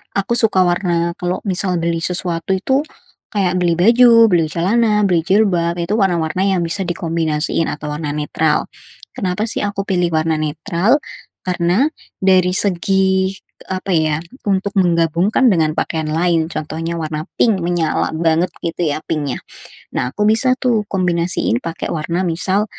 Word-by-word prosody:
aku 200 +4 +1
suka 220 -5 +3
warna 175 -1 0
kalau 180 0 -2
misal 185 -2 -1
beli 165 0 -1
sesuatu 175 +1 -2
itu 265 +9 0 0.5
kayak 185 -3 +1
beli 175 -1 +2
baju, 230 +3 +6
beli 170 -2 +3
celana, 210 +6 +1
beli 175 -4 +2
jilbab 180 -2 +1
itu 170 +3 -2
warna-warna 175 -4 0
yang 190 -3 +1
bisa 165 +4 -1
dikombinasiin 165 -2 -1
atau 150 0 -5
warna 150 0 -4
netral. 150 +1 0 0.5
Kenapa, 190 -3 -2
sih, - - -2
aku 200 -1 -3
pilih 180 -3 0
warna 160 +1 +1
netral? 170 - +1 0.5
Karena 180 +6 +1 0.4
dari 185 -1 +3
segi, 190 0 +1
eee, 190 -1 -8
apa, 195 - -4
ya, 155 -2 +2 0.3
untuk 200 0 0
menggabungkan 175 - +2
dengan 160 -6 +2
pakaian 160 -2 -2
lain, 165 0 +1
contohnya 165 +1 -4
warna 155 -1 -4
pink 210 -6 +2
menyala 170 -2 0
banget, 165 +2 +1 0.2
gitu, 170 -1 -1
ya, - - -2
pink-nya. 145 -4 -3 0.6
Nah, 125 - 0
aku 210 - -1
bisa, 240 +4 +4
tuh, 230 -4 +1
kombinasiin 175 - 0
pakai 165 0 -4
warna, 170 +3 -2
misal 185 +4 0
175 Hz, 145 wpm, -18 LUFS, 165-195 Hz, 0.6 s, baju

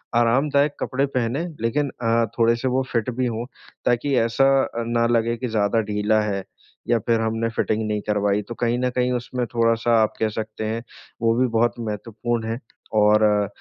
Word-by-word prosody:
आरामदायक 140 +5 +3
कपड़े 135 +2 0
पहने 125 +8 -1 0.2
लेकिन 140 +5 0
अ, 115 0 +2
थोड़े-से 115 +3 +3
वो 130 - +2
फिट 115 0 0
भी 130 - +1
हो 120 0 -2 0.4
ताकि 125 +3 +1
ऐसा 115 +4 +3
अ, 115 0 -4
ना 120 0 +1
लगे 115 0 +1
की 125 - -3
ज़्यादा 110 0 +1
ढीला 105 +1 +2
है, 100 -2 -2 0.5
या 120 - +3
फिर 115 -1 +3
हमने 115 +1 -1
फिटिंग 110 0 0
नहीं 105 -1 -1
करवाई 105 0 +1
तो 120 - -5
कहीं 120 +1 +1
न 125 0 +1
कहीं 125 0 +1
उसमें 125 0 -2
थोड़ा-सा 115 0 +3
आप 110 - -1
कह 110 - +1
सकते 110 0 -5
हैं, 115 +2 -3 0.4
वो 115 0 +3
भी 130 - +4
बहुत 120 0 +3
महत्वपूर्ण 115 +1 -3
है 115 - -3 0.4
और 105 0 +5
अ, 105 -1 +3
115 Hz, 185 wpm, -23 LUFS, 110-120 Hz, 0.5 s, और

